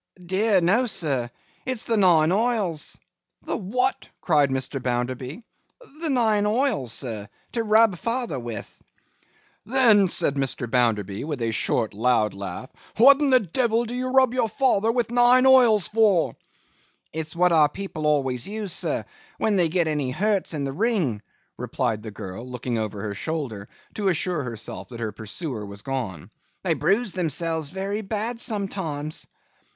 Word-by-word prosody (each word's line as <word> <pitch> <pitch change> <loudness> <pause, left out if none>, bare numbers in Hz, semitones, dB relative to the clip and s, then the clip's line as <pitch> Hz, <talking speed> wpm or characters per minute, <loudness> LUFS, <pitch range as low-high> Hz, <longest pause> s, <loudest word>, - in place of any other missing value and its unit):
'Dear, 190 +2 +2
no, 215 +9 +3
sir! 135 - -1 0.3
It's 255 -3 -2
the 230 - +1
nine 175 -6 +4
oils.' 205 -7 0 0.5
'The - - -2
what?' 250 +6 -1
cried 150 -5 +3
Mr. 135 +1 -2
Bounderby. 125 - -3 0.6
'The 325 -1 -1
nine 220 -6 +2
oils, 220 - 0
sir, 110 -5 -4 0.2
to 235 - -1
rub 215 -4 +4
father 230 - -2
with.' 115 -3 -7 0.9
'Then,' 225 -5 +5
said 145 - +1
Mr. 135 -2 -1
Bounderby, 110 -5 0
with 150 -4 -4
a - - +1
loud - - -3
short 110 +1 0
laugh, 105 - -1 0.3
'what 270 +5 +8
the 270 -4 +4
devil 230 +4 +1
do 235 - -6
you 255 +1 -2
rub 260 -1 +4
your 245 -3 +1
father 225 -2 +2
with 235 -1 -1
nine 245 +1 +5
oils 245 -7 +6
for?' 200 - +2 0.8
'It's 160 +1 -5
what 180 +1 +3
our 155 -3 +5
people 155 -3 -4
aways 135 -5 0
use, 205 -3 -4
sir, - - -2 0.3
when 215 -2 +1
they 175 -4 +3
get 170 0 +1
any 150 -4 -1
hurts 195 +4 0
in 145 - -2
the 135 -1 -3
ring,' 180 - 0 0.4
replied 115 -4 -2
the 110 - -7
girl, 95 +1 -8
looking 125 -1 -3
over 105 -2 -4
her 105 -2 -3
shoulder, 115 -5 -4 0.2
to 205 -2 -2
assure 175 -2 0
herself 115 -6 -7
that 120 -2 -9
her 110 -2 -3
pursuer 110 - -5
was 100 0 -9
gone. 120 - -4 0.3
'They - - +2
bruise 210 0 +1
themselves 160 -3 -1
very 195 +4 -3
bad 220 +3 -3
sometimes. 180 -8 -3
170 Hz, 155 wpm, -24 LUFS, -, 0.9 s, what